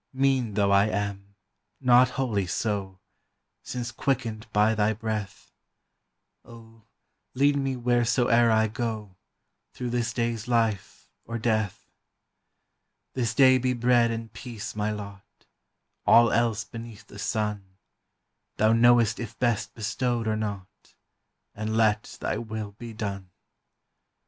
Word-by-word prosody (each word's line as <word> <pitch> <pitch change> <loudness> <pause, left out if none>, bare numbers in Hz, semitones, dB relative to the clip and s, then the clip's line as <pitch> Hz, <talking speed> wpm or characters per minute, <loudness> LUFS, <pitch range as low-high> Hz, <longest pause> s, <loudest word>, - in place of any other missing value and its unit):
Mean 130 -5 +1
though 100 -1 +2
I 100 0 +5
am, 100 0 -4 0.4
not 125 -1 +5
wholly 110 -8 0
so, 95 0 -2 0.6
Since 120 -1 -5
quickened 115 -3 -2
by 105 +1 +3
thy 110 0 +1
breath; 105 -2 -5 0.9
O, 115 -1 -16 0.5
lead 140 +2 +3
me 135 -2 -1
wheresoe'er 120 -1 +3
I 110 0 +3
go, 110 -3 -4 0.6
Through 125 -1 -4
this 120 -1 -1
day's 115 -1 -2
life 115 -5 -1
or 115 - -5
death! 110 -3 -1 1.3
This 120 -4 -1
day 130 -2 +6
be 130 0 0
bread 120 -1 +3
and 115 -1 -5
peace 115 -6 -7
my 105 0 -1
lot; 100 -2 -9 0.6
All 115 0 +7
else 115 -1 +1
beneath 115 0 -10
the 100 - -12
sun, 105 -4 -3 0.8
Thou 110 +1 +4
knowest 115 -1 +4
if 115 -1 -7
best 120 -3 -1
bestowed 120 +1 -1
or 110 - +1
not, 100 -3 -6 0.6
And 110 +1 -3
let 105 -2 +1
thy - - -2
will 110 -2 -5
be 115 +3 -9
done. 100 -4 -5
110 Hz, 125 wpm, -26 LUFS, 105-120 Hz, 1.3 s, All